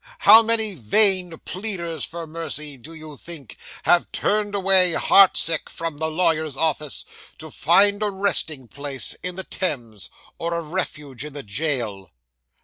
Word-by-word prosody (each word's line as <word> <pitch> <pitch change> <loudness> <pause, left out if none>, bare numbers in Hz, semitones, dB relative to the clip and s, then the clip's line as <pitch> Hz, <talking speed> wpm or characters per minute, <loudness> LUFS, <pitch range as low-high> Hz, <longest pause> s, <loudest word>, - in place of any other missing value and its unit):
How 225 - +9
many 220 -2 +1
vain 180 - +4
pleaders 180 -4 -4
for 170 0 -7
mercy, 155 -2 -6
do 135 +5 -13
you 155 -2 -12
think, 155 -7 -8 0.3
have 175 0 +2
turned 205 -1 -2
away 190 -2 +4
heart 195 +3 +5
sick 165 -1 +2
from 165 -3 -6
the 160 +1 -2
lawyer's 160 -3 -1
office, 155 -2 -1 0.3
to - - -11
find 205 +1 +4
a 210 - -1
resting 185 -9 0
place 140 0 -3
in 180 -1 -5
the 190 - -5
Thames, 120 - -5 0.3
or 170 0 -4
a 170 - -3
refuge 150 -6 -6
in 150 -1 -9
the 145 -1 -7
jail? 110 -4 -3
165 Hz, 150 wpm, -21 LUFS, 145-190 Hz, 0.3 s, How